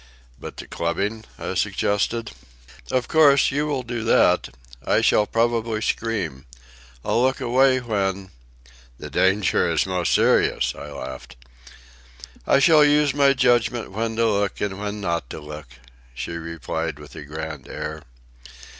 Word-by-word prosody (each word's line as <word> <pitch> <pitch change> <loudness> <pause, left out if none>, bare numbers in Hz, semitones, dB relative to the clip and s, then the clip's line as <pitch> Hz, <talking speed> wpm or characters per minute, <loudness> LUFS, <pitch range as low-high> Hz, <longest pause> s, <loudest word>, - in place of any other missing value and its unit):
"But - - -9
the - - -7
clubbing?" 100 +7 -3
I - - -4
suggested. 115 +3 -1 0.6
"Of 130 -1 0
course, 145 -4 +5
you 145 +2 -1
will 140 -4 -2
do 120 -1 -4
that. - - +3 0.3
I - - +2
shall 105 - +3
probably 115 -1 0
scream. 95 -13 -2 0.6
I'll 120 - +1
look 130 +1 +1
away 130 +2 +3
when—" 100 -4 -2 0.7
"The - - -9
danger 95 +1 +2
is - - +1
most 90 -2 -1
serious," - - +2
I 75 - -9
laughed. 65 -2 -8 1.1
"I - - +5
shall 155 +1 +6
use 145 -1 +3
my 140 -1 +4
judgment 120 -3 +1
when 110 +3 -3
to 115 +1 +2
look 100 -2 0
and 100 -1 -3
when 105 0 -4
not 85 -8 -2
to - - -7
look," 75 -1 -9 0.5
she 85 - -5
replied 80 -1 -4
with 75 -1 -13
a - - -8
grand 75 -1 -7
air. 75 0 -6
105 Hz, 145 wpm, -23 LUFS, 85-125 Hz, 1.1 s, shall